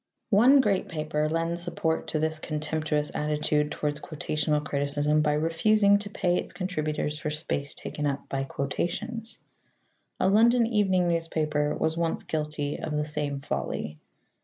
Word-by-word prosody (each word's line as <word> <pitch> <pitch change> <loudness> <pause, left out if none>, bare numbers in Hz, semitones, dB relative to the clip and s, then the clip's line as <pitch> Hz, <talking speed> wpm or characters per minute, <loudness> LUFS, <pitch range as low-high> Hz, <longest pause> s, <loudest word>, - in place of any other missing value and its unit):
One 250 +7 +7
great 200 -6 0
paper 155 -1 -1
lends 165 +1 -1
support 170 -2 -1
to - - -1
this 160 0 0
contemptuous 155 -1 -2
attitude 150 0 0
towards 150 -1 -2
quotational 150 -1 -1
criticism 145 +2 +1
by 150 -1 +2
refusing 200 +7 +3
to 205 0 -6
pay 180 -3 +1
its - - -4
contributors 155 -5 -2
for 150 - -2
space 150 -2 -2
taken 150 -1 -4
up 140 0 -3
by 135 0 -2
quotations. 220 - -3 0.8
A - - +3
London 230 +4 +5
evening 195 -5 +2
newspaper 155 -3 0
was 160 +1 0
once 165 -1 0
guilty 150 -2 -3
of 150 -1 -3
the 150 - 0
same 150 -2 -2
folly. 75 - -3
155 Hz, 145 wpm, -27 LUFS, 150-180 Hz, 0.8 s, One